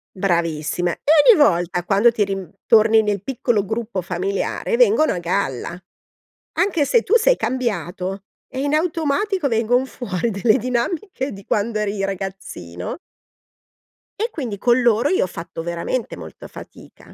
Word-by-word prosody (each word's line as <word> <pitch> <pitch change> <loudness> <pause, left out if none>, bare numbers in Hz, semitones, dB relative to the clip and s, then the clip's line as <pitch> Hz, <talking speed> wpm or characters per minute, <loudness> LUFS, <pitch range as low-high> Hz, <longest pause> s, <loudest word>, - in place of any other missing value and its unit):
Bravissime 170 -2 -1
e 295 - +4 0.2
ogni 335 - +2
volta 175 -7 +2
quando 205 +6 +4
ti 215 -3 +1
rim 195 -4 -5
torni 225 -1 +5
nel 205 -2 -2
piccolo 240 -3 0
gruppo 220 -1 -3
familiare, 190 - -2
vengono 440 -10 +4
a - - -3
galla, 175 -2 -2 0.8
anche 360 -5 +2
se 475 - +3
tu 450 - +3
sei - - +4
cambiato 195 - -3 0.2
e 260 - -6
in 285 +1 -1
automatico 330 +2 0
vengon 240 +2 +1
fuori 230 -4 -3
delle 215 +3 +2
dinamiche 265 - -2
di 195 -1 -11
quando 215 +1 -1
eri 200 -1 -2
ragazzino 190 - -6 1.3
e 460 - 0
quindi 250 - -5
con 240 +4 +3
loro 240 +3 +3
io 375 - +2
ho - - -1
fatto 165 -1 -7
veramente 170 +8 -3
molta - - -10
fatica. - - -14
215 Hz, 145 wpm, -21 LUFS, 185-265 Hz, 1.3 s, torni